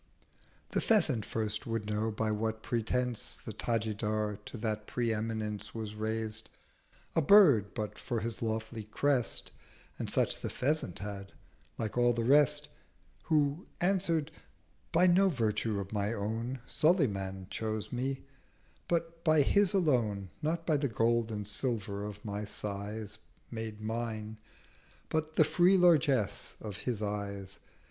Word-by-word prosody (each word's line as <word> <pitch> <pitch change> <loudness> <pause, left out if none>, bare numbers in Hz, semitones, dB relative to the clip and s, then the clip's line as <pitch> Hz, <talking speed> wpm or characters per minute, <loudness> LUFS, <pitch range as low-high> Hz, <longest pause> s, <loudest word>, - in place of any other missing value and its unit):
The - - +1
Pheasant 145 - +3
first 110 0 -2
would 115 -2 -2
know 105 +1 0
by 110 0 -1
what 110 +1 -2
pretence 120 0 -1
The - - -5
Tajidar 110 -2 -1
to - - -7
that 110 -1 -2
pre 120 -2 0
eminence 105 -1 -3
Was 110 -2 -4
raised—a 110 +7 -4
Bird, 145 - +6
but 105 -1 -4
for 120 - -2
his 115 +1 -4
lofty 110 -1 -3
Crest 125 +3 0 0.5
(And - - -3
such - - +1
the - - -3
Pheasant 140 - -1
had) 100 -1 -6 0.4
like 110 +1 -2
all 120 0 +5
the 115 0 -1
Rest—130 140 +3 +4 0.6
Who 150 +2 +1
answer'd—'By 175 -1 -1
no 185 +2 +5
Virtue 110 - 0
of 100 +1 -6
my 105 +1 0
own 115 +4 -3
Sulayman 100 - +1
chose 110 -1 -3
me, 130 +2 -2 0.6
but 165 -1 -1
by 155 -3 +5
His 200 +5 +3
alone: 115 - +1
Not 165 +2 -1
by 155 -3 +3
the 140 -1 0
Gold 115 +1 +2
and 105 -2 -4
Silver 105 -3 -2
of 105 0 -8
my 105 0 -3
Sighs 105 +1 -5 0.3
Made 110 -2 -5
mine, 110 -1 -3 0.7
but 155 0 -1
the - - +7
free 180 +5 +4
Largess 150 - +3
of 105 -3 -6
his 110 -2 -2
Eyes. 100 -2 -4
110 Hz, 135 wpm, -32 LUFS, 105-140 Hz, 0.7 s, the